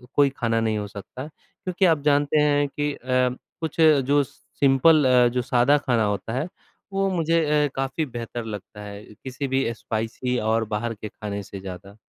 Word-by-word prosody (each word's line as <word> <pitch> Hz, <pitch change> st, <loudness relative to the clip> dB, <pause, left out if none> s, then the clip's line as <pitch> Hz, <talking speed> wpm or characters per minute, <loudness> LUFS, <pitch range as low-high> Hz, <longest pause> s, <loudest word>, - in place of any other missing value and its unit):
कोई 145 Hz, -1 st, +5 dB
खाना 115 Hz, -2 st, +1 dB
नहीं 110 Hz, -1 st, 0 dB
हो 105 Hz, -1 st, -3 dB
सकता, 105 Hz, +6 st, -8 dB
क्योंकि 185 Hz, +4 st, -3 dB
आप 160 Hz, -4 st, +3 dB
जानते 145 Hz, 0 st, +3 dB
हैं 145 Hz, -1 st, +3 dB
कि 145 Hz, +1 st, -2 dB
अ, -, -, -10 dB, 0.6 s
कुछ 160 Hz, +1 st, -2 dB
जो 145 Hz, -2 st, +5 dB
सिंपल 140 Hz, +3 st, +2 dB
अ, 125 Hz, -1 st, +5 dB
जो 125 Hz, -, +1 dB
सादा 125 Hz, +4 st, +3 dB
खाना 125 Hz, -6 st, +1 dB
होता 105 Hz, +2 st, -2 dB
है 140 Hz, +7 st, -1 dB, 0.5 s
वो 195 Hz, 0 st, +1 dB
मुझे 165 Hz, -2 st, +1 dB, 0.2 s
अ, -, -, +1 dB
काफ़ी 135 Hz, +4 st, -1 dB
बेहतर 120 Hz, -2 st, -6 dB
लगता 105 Hz, -1 st, -8 dB
है 100 Hz, 0 st, -8 dB, 0.2 s
किसी 135 Hz, +1 st, -4 dB
भी 135 Hz, +1 st, +1 dB
स्पाइसी 115 Hz, +3 st, -3 dB
और 110 Hz, +1 st, +1 dB
बाहर 115 Hz, +2 st, -2 dB
के 105 Hz, 0 st, -7 dB
खाने 100 Hz, -2 st, -6 dB
से 95 Hz, -, -9 dB
ज़्यादा। 95 Hz, +1 st, -9 dB
130 Hz, 180 wpm, -24 LUFS, 110-145 Hz, 0.6 s, कोई